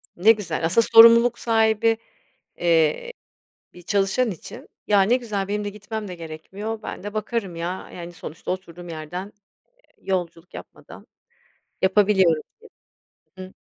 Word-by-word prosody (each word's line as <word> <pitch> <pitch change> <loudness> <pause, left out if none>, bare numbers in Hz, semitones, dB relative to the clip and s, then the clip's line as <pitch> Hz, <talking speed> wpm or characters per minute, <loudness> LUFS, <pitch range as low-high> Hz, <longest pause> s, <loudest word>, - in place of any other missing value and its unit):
Ne 210 +6 +6
güzel. 175 -7 -2
Asıl 185 +8 +3
sorumluluk 230 +2 +7
sahibi, 225 0 +2 0.6
eee, 170 - +1 0.6
bir 175 - -14
çalışan 200 +5 +1
için. 175 - -10 0.2
"Ya, 205 -2 +4
ne 225 +6 +3
güzel 210 -6 -4
benim 210 0 -2
de 205 - -2
gitmem 210 0 -7
de 180 - -6
gerekmiyor. 190 +7 -7
Ben - - -7
de 205 +1 -7
bakarım 215 -5 -3
ya, 175 +3 -5
yani, 175 0 -8
sonuçta 160 -1 -8
oturduğum 175 -1 -6
yerden, 165 +3 -6 0.5
eee, - - -35 0.2
yolculuk 175 -2 -4
yapmadan - - -12 0.8
yapabiliyorum." 190 -4 +3 0.9
diye. 185 - -7
Hıı. - - -19
195 Hz, 135 wpm, -23 LUFS, 175-220 Hz, 0.9 s, sorumluluk